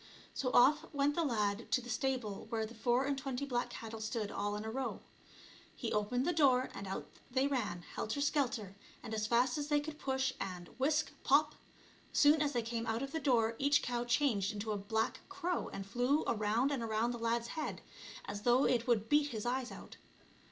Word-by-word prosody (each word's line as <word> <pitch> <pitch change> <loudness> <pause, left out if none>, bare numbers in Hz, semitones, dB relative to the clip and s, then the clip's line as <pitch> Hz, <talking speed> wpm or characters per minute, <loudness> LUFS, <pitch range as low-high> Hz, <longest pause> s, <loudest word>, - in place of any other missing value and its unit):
So 255 - -1
off 285 +5 +5
went 285 0 +2
the 335 - +1
lad 215 -5 -1
to - - +5
the 245 - -10
stable 245 -6 -2
where 225 -2 -1
the 225 - -10
four 240 +3 +1
and 280 0 0
twenty 270 0 -3
black 245 -3 -1
cattle 225 -1 -7
stood 220 -1 -2
all 205 +1 -2
in 210 +1 -5
a 220 - -3
row. 265 +2 -3 0.8
He 235 - -3
opened 215 +5 0
the 350 - +2
door, 265 -5 +4
and 200 0 -6
out 190 - -4 0.2
they 260 +2 +2
ran 245 -10 -1
helter 220 - -4
skelter 260 -9 0 0.3
and 225 - -6
as 215 -1 -1
fast 245 +5 +2
as 290 - -3
they 295 -1 +3
could 300 +1 -7
push, 265 -1 0
and 180 -2 -5
— - - -26
whisk! 295 +3 +2
pop! 300 +2 +4 0.3
— - - -27
soon 295 +1 +6
as 295 -1 +1
they 240 - 0
came 230 0 -3
out 225 +3 -1
of 275 - -5
the 320 - -2
door 235 -6 +2
each 285 +1 +3
cow 240 -1 -1
changed 235 -5 +2
into 215 +1 -4
a - - 0
black 220 +3 -1
crow 365 -2 -2
and 195 0 -6
flew 245 +9 +1
around 220 +5 +1
and 275 -4 -1
around 225 +1 0
the 240 - -5
lad's 230 0 0
head 310 -2 -4 0.4
as 205 - -5
though 245 +4 +4
it 240 -1 +2
would 225 -3 +2
beat 295 +2 +4
his 220 -6 -5
eyes 250 +1 -1
out. - - -10
245 Hz, 215 wpm, -34 LUFS, 220-280 Hz, 0.8 s, soon